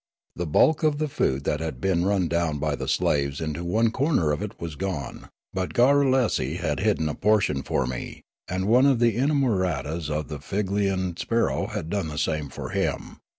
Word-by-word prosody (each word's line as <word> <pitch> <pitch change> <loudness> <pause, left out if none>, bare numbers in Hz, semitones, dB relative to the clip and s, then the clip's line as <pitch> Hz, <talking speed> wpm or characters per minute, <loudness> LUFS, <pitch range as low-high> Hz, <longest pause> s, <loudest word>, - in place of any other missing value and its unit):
The 85 0 -3
bulk 150 - +4
of 155 -2 +2
the 155 0 0
food 70 - 0
that 75 - -1
had 80 -6 -4
been 90 +2 +1
run 100 -3 +2
down 85 -2 0
by - - -1
the - - -5
slaves 70 -1 +1
into 80 +1 -3
one 110 +6 +2
corner 130 - +1
of 75 - -2
it - - -6
was 85 -2 -5
gone; 85 -7 -5 0.2
but 95 -1 -3
Garrulesi 130 -1 +3
had - - -2
hid - - +2
den 80 - -1
a 75 - -2
portion 100 -9 +2
for 65 - -1
me, 65 0 -6 0.2
and 95 +1 -2
one 125 +6 +5
of 135 -3 +4
the 115 -2 +2
inamoratas 95 - 0
of 75 0 -2
the 75 - -6
Figlefian 95 +1 -1
sparrow 115 0 0
had 80 - -5
done 100 -5 -1
the 75 -1 -6
same 75 -2 -1
for - - -7
him. - - -2
90 Hz, 195 wpm, -25 LUFS, 75-115 Hz, 0.2 s, one